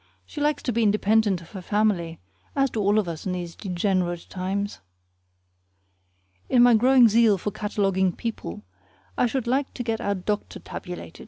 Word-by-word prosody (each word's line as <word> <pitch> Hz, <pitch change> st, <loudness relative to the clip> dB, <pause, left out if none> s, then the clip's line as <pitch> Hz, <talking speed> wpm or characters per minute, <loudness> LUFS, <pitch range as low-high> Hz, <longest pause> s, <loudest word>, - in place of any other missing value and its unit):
She 295 Hz, -, -7 dB
likes 300 Hz, 0 st, 0 dB
to 245 Hz, -, -1 dB
be 235 Hz, -, +1 dB
independent 210 Hz, -2 st, +2 dB
of 170 Hz, -, -15 dB
her 190 Hz, -, -7 dB
family, 180 Hz, -5 st, 0 dB, 0.4 s
as 275 Hz, -2 st, +2 dB
do 225 Hz, -, -3 dB
all 205 Hz, +1 st, +2 dB
of 210 Hz, -4 st, +1 dB
us 165 Hz, +2 st, -5 dB
in 185 Hz, -, -1 dB
these 175 Hz, -2 st, -5 dB
degenerate 180 Hz, -2 st, -1 dB
times. 195 Hz, +2 st, -3 dB, 1.7 s
In 245 Hz, -1 st, +5 dB
my 245 Hz, -1 st, +7 dB
growing 250 Hz, +2 st, +6 dB
zeal 220 Hz, -2 st, +4 dB
for 205 Hz, +3 st, -3 dB
cataloguing 195 Hz, -3 st, 0 dB
people, 165 Hz, -, -6 dB, 0.5 s
I -, -, +2 dB
should 255 Hz, 0 st, -2 dB
like 265 Hz, +3 st, -1 dB
to 245 Hz, -, -3 dB
get 225 Hz, -1 st, -2 dB
our 200 Hz, -, 0 dB
doctor 205 Hz, +3 st, -3 dB
tabulated. 180 Hz, -2 st, -8 dB
205 Hz, 170 wpm, -25 LUFS, 185-230 Hz, 1.7 s, my